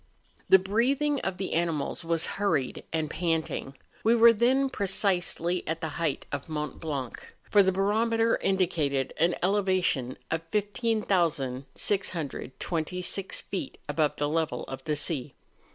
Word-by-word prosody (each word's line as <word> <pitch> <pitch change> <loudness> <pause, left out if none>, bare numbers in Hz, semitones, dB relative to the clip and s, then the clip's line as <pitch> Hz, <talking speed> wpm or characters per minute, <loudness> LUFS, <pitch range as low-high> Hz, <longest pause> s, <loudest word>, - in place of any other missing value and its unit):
The 190 - +9
breathing 255 +9 +1
of 190 -5 -3
the 190 - -3
animals 165 -1 -1
was 165 -1 +1 0.2
hurried 140 -11 0
and 160 -1 0
panting. 160 -4 -2 0.3
We 225 +2 +5
were 235 0 +8
then 255 +5 +3
precisely 185 -5 0
at 160 +1 -2
the 160 - -3
height 155 -5 -1
of 145 +2 -4
Mont 150 -2 -4
Blanc, 140 -6 -4 0.2
for 205 - +5
the 190 -1 +3
barometer 225 +4 +2
indicated 155 -8 0
an 170 +2 +3
elevation 185 -10 +1
of 160 0 0
15,626 180 - -1
feet 195 - -5
above 155 -2 +1
the 145 - 0
level 160 +1 -1
of 135 - -7
the 155 -1 0
sea. 145 -2 -2
175 Hz, 130 wpm, -28 LUFS, 155-205 Hz, 0.3 s, The